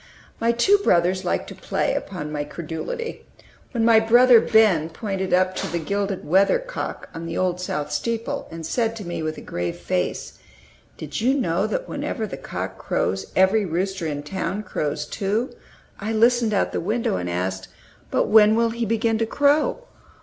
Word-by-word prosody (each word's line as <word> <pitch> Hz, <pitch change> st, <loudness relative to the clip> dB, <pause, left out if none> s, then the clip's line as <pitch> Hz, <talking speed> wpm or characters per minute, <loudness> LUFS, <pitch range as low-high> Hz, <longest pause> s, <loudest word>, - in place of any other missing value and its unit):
My 230 Hz, +1 st, +3 dB
two 315 Hz, +13 st, +4 dB
brothers 185 Hz, -, +2 dB
liked 180 Hz, -, -1 dB
to -, -, -7 dB
play -, -, -1 dB
upon 150 Hz, -6 st, -4 dB
my 150 Hz, -1 st, -2 dB
credulity. 170 Hz, -, -6 dB, 0.5 s
When 230 Hz, -3 st, 0 dB
my 230 Hz, -1 st, +7 dB
brother 240 Hz, +1 st, +6 dB
Ben 205 Hz, -9 st, +4 dB
pointed 190 Hz, +1 st, -4 dB
up 185 Hz, +1 st, +3 dB
to -, -, -2 dB
the 170 Hz, -, -1 dB
gilded 200 Hz, +3 st, -2 dB
weather 190 Hz, -, +4 dB
cock -, -, -6 dB
on 165 Hz, 0 st, -6 dB
the 165 Hz, -, -4 dB
Old 180 Hz, -1 st, 0 dB
South 150 Hz, -4 st, -3 dB
steeple, 225 Hz, +10 st, -2 dB
and 165 Hz, 0 st, -7 dB
said 225 Hz, +6 st, 0 dB
to 210 Hz, -4 st, -7 dB
me 175 Hz, -1 st, -4 dB
with 155 Hz, 0 st, -2 dB
a -, -, -8 dB
very -, -, -14 dB
grave 85 Hz, 0 st, -3 dB
face, 90 Hz, -1 st, -3 dB, 0.6 s
"Did 145 Hz, +1 st, -5 dB
you 260 Hz, +4 st, +3 dB
know 190 Hz, -5 st, 0 dB
that -, -, -3 dB
whenever 225 Hz, -5 st, -3 dB
that 210 Hz, -, -8 dB
cock -, -, -5 dB
crows 95 Hz, +1 st, -1 dB
every 190 Hz, +3 st, +4 dB
rooster 190 Hz, 0 st, -2 dB
in 145 Hz, -1 st, -4 dB
town 190 Hz, +5 st, -3 dB
crows 150 Hz, -5 st, -3 dB
too?" 210 Hz, -, -2 dB, 0.4 s
I 215 Hz, +3 st, -3 dB
listened 235 Hz, 0 st, +3 dB
out 200 Hz, -, +2 dB
at -, -, -14 dB
the -, -, -1 dB
window, 215 Hz, -, 0 dB
and 90 Hz, -1 st, -3 dB
asked, 95 Hz, +2 st, -3 dB, 0.4 s
"But -, -, +1 dB
when 215 Hz, 0 st, +6 dB
will 230 Hz, 0 st, +2 dB
he 235 Hz, 0 st, -2 dB
begin 225 Hz, 0 st, +1 dB
to 225 Hz, -, 0 dB
crow?" 290 Hz, -, +2 dB
195 Hz, 185 wpm, -23 LUFS, 165-230 Hz, 0.6 s, my